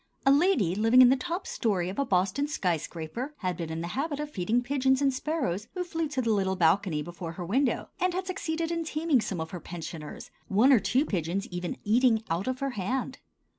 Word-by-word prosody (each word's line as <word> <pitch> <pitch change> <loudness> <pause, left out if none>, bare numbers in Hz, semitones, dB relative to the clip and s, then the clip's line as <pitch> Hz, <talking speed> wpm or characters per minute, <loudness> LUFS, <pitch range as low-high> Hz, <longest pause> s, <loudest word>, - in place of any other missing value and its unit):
A 275 - +6
lady 280 - +3
living 225 +5 +6
in 245 - +7
the 265 - +5
top 345 +7 -4
story 195 -7 -1
of 190 +6 -4
a 280 - +2
Boston 195 +9 +1
skyscraper 180 - -3
had 185 -2 -1
been 165 -1 -5
in 160 +1 -4
the 170 - -4
habit 285 - -2
of 300 0 -4
feeding 215 +1 0
the 245 - +2
pigeons 265 0 +2
and 275 -1 +2
sparrows 255 - -2
who 365 - -1
flew 330 -2 -2
to 270 -3 -2
the 230 - +1
little 190 -2 +1
balcony 165 -2 +2
before 175 0 -7
her 175 +1 -6
window, 255 +9 +1
and 365 -1 +1
had 370 0 -2
succeeded 335 -3 -2
in 335 -1 -1
taming 310 -4 +1
some 190 -5 -3
of 160 0 -4
her 180 - -5
pensioners, 165 -3 -8 0.2
one 230 +8 +5
or 245 - +6
two 260 +8 +1
pigeons 185 - -2
even 175 -1 -4
eating 225 +1 +3
out 170 +6 -1
of 255 0 -2
her 275 0 -1
hand. 245 +5 -3
235 Hz, 220 wpm, -28 LUFS, 180-285 Hz, 0.2 s, in